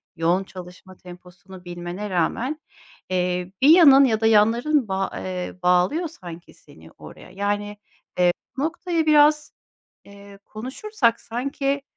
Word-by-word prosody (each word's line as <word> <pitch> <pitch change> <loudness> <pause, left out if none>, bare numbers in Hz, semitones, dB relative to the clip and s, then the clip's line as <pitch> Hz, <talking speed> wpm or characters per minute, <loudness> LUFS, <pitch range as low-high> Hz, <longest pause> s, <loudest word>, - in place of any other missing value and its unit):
yoğun 175 +3 0
çalışma 185 0 -13
temposunu 180 +1 -14
bilmene 175 +4 -7
rağmen, 235 - -2 0.5
eee, 180 0 -2
bir 275 - +5
yanın 285 -5 +7
ya 220 -3 0
da - - +1
yanların 230 +5 +2
bağ 190 0 -2
eee, 180 -1 -5
bağlıyor 180 - +2
sanki 175 - -12
seni 80 +1 -18
oraya. 75 - -14
Yani, 205 +2 -3 0.4
eee, 180 -1 +4 0.3
bu 270 - -2
noktayı 335 0 -2
biraz, 300 0 +3 0.5
eee, 200 0 -15
konuşursak 250 - -2
sanki, 275 +3 -3
205 Hz, 125 wpm, -22 LUFS, 180-275 Hz, 0.5 s, yanın